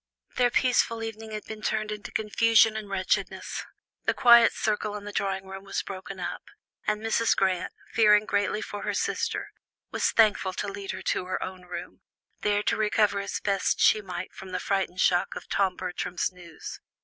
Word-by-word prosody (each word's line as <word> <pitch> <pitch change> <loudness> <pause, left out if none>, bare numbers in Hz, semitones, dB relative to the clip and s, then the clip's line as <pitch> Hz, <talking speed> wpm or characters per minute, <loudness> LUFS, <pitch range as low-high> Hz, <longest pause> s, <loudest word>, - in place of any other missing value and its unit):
Their 245 -1 +4
peaceful 235 -2 +2
evening 225 0 -6
had 215 -1 -5
been 220 -1 -8
turned 215 0 -1
into 210 0 -6
confusion 220 +1 +4
and 215 -2 -5
wretchedness. 190 -2 -1 0.4
The - - +2
quiet 235 -2 +7
circle 210 0 -1
in 205 - -6
the 205 - -6
drawing 195 -1 -2
room 195 0 -8
was 195 - -3
broken 190 0 -7
up, 175 - -4 0.5
and 210 0 +1
Mrs. 225 +1 +2
Grant, 190 -2 +1 0.2
fearing 210 -1 +5
greatly 205 +1 0
for 205 - -6
her - - -2
sister, - - -1 0.4
was - - +1
thankful 210 -4 +3
to 205 - -3
lead 200 0 -6
her - - -4
to - - 0
her 185 - -2
own 185 -1 -7
room, 175 0 -8 0.4
there 205 0 +1
to - - +1
recover 210 -1 +2
as 200 0 -3
best 200 -1 +1
she 215 - +5
might 185 -2 -6
from 190 - -10
the 185 - -2
frightful 195 -2 -1
shock 180 -1 +2
of - - -8
Tom 190 -2 +1
Bertram's 180 -1 -2
news. 175 -3 -10
205 Hz, 185 wpm, -27 LUFS, 185-215 Hz, 0.5 s, quiet